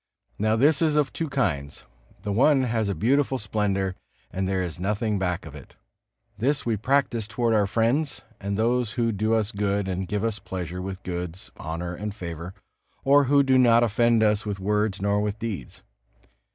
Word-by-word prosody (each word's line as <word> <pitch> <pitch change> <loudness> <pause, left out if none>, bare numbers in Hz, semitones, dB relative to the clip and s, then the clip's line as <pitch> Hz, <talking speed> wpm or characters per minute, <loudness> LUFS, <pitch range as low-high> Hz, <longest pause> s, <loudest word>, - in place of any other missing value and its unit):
Now 110 +1 +2
this 140 +6 +4
is 155 -2 +2
of 150 -2 +1
two 160 -2 -3
kinds. 75 - -2 0.4
The 105 - -2
one 135 +5 +4
has 115 -4 0
a 100 - -1
beautiful 130 - +2
splendor, 100 -3 -1 0.4
and 95 +1 -2
there 95 -1 0
is 85 -2 -6
nothing 105 +2 -1
back 90 -2 -2
of - - -10
it. - - -13 0.6
This 140 +5 0
we 115 -2 +1
practice 120 -1 +1
toward 115 +1 0
our 105 -2 +3
friends 120 +8 0 0.2
and 100 0 -3
those 120 0 +1
who 115 -2 +1
do 110 +2 +1
us 110 -1 0
good 100 -1 -1
and 95 0 -2
give 105 +2 -2
us 110 -2 -1
pleasure 90 -1 -5
with 95 0 -6
goods, 90 0 -5
honor 85 +2 -5
and 105 +3 -5
favor, 85 -2 -7 0.5
or 140 +1 +5
who 140 +1 +4
do 130 -1 +4
not 120 -1 +6
offend 115 0 +3
us 105 -1 +2
with 105 -2 -4
words 105 0 0
nor 100 0 +2
with 105 0 -2
deeds. 110 - -6
105 Hz, 185 wpm, -25 LUFS, 95-120 Hz, 0.6 s, not